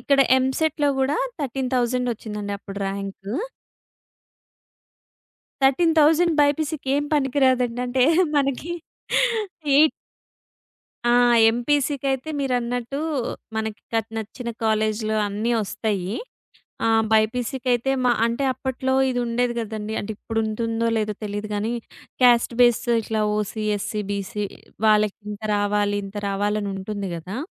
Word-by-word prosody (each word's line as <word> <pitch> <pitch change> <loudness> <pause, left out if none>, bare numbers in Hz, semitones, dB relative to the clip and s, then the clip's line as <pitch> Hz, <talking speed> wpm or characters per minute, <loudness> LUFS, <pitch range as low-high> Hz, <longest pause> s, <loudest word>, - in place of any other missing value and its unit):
ఇక్కడ 280 -1 +3 0.2
ఎంసెట్‌లో 290 +3 +1
గూడా 265 +1 +1 0.2
13,000 255 -2 0
ఒచ్చిందండి 210 -2 -6
అప్పుడు 200 0 -8
ర్యాంకు. 195 0 -5 2.3
13,000 320 +3 +4
బైపీసీ‌కేం 290 -1 +1
పనికి 285 -1 +1
రాదండి 250 -2 +1
అంటే 250 +1 +2 0.3
మనకి 275 +3 0 1.0
ఎయిట్ 310 +2 +6 1.2
ఆ! - - +5 0.4
ఎంపీసీకైతే 270 +2 0
మీరన్నట్టు 245 -1 -1 0.6
మనకి 220 -1 -3
క 225 - +3 0.2
నచ్చిన 235 +3 -5
కాలేజీలు 215 0 +1
అన్నీ 210 +4 -1
ఒస్తాయి. 200 -1 -2 0.7
ఆహ్, 225 0 +4
బైపీసీ‌కైతే 245 +3 +1
మా 245 - +5
అంటే 235 +4 -1
అప్పట్లో 260 0 -2 0.2
ఇది 245 -1 -1
ఉండేది 240 +1 0
గదండీ 220 -1 -4
అంటే 205 - -4
ఇప్పుడు 225 0 -3
ఉంటుందో 230 +1 -1
లేదో 215 -1 -1
తెలీదు 205 +1 -4
గానీ 215 +3 -1 0.5
క్యాస్ట్ 240 -1 +5
బేస్ 240 -2 +5 0.2
ఇట్లా 220 0 -2 0.2
ఓసీ 215 +1 -3
ఎస్సీ 210 +1 -3
బీసీ 200 +1 -3 0.4
వాళ్ళకి 210 -1 +3
ఇంత 210 0 -7
రావాలి 205 0 +1
ఇంత 195 +1 -8
రావాలనుంటుంది 200 0 -2
గదా. 180 +6 -6
230 Hz, 105 wpm, -23 LUFS, 210-265 Hz, 2.3 s, ఎయిట్